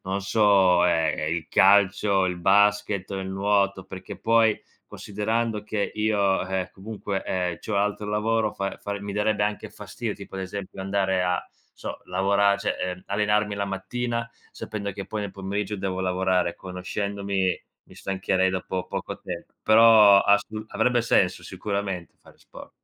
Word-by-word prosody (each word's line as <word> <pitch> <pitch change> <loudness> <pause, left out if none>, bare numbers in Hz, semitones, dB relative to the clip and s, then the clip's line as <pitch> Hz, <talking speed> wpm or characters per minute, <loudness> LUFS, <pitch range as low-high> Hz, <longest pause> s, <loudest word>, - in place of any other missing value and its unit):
non 95 +1 -2
so, 95 -4 +4
ehm, 80 -2 +2
è - - -3
il 80 0 -2
calcio, 100 0 +4
il 90 -1 -1
basket 100 +1 +2
o 95 - -3
il 95 - -5
nuoto, 100 -1 +1
perché 95 -1 -9
poi 115 -1 +3 0.3
considerando 110 +1 -2
che 105 -1 -2
io, 105 -3 +1
ehm, 95 -1 -3
comunque, 100 -1 -5
ehm, 90 -2 -2
c'ho 110 - -4
un - - +2
altro 105 +1 -1
lavoro, 110 +1 +1
fa 100 0 -4
fa 100 0 -3
mi 100 0 -5
darebbe 105 0 +1
anche 105 0 -3
fastidio - - -6
tipo - - -11
ad 95 - -4
esempio 95 0 -6
andare 95 -1 0
a 90 0 +1
non - - -12
so - - -6
lavorare, 100 +1 +2
cioè, 100 - -2
ehm, 90 0 -4
allenarmi 105 0 +1
la 100 - -1
mattina, 115 +4 -3 0.2
sapendo 100 -2 -5
che 100 +1 -7
poi 110 -1 -4
nel 100 -2 -5
pomeriggio 100 +1 -3
devo 95 -1 -3
lavorare, 95 -1 0
conoscendomi, 95 +1 -3 0.2
mi - - -18
stancherei 95 -1 0
dopo 95 0 -3
poco - - -5
tempo. - - -8
Però 110 -2 +7
a 100 +1 +5
st 105 - -10 0.2
avrebbe 120 +1 +1
senso 115 - +2
sicuramente 100 -5 -4
fare - - -19
sport. - - -13
100 Hz, 165 wpm, -25 LUFS, 95-105 Hz, 0.3 s, Però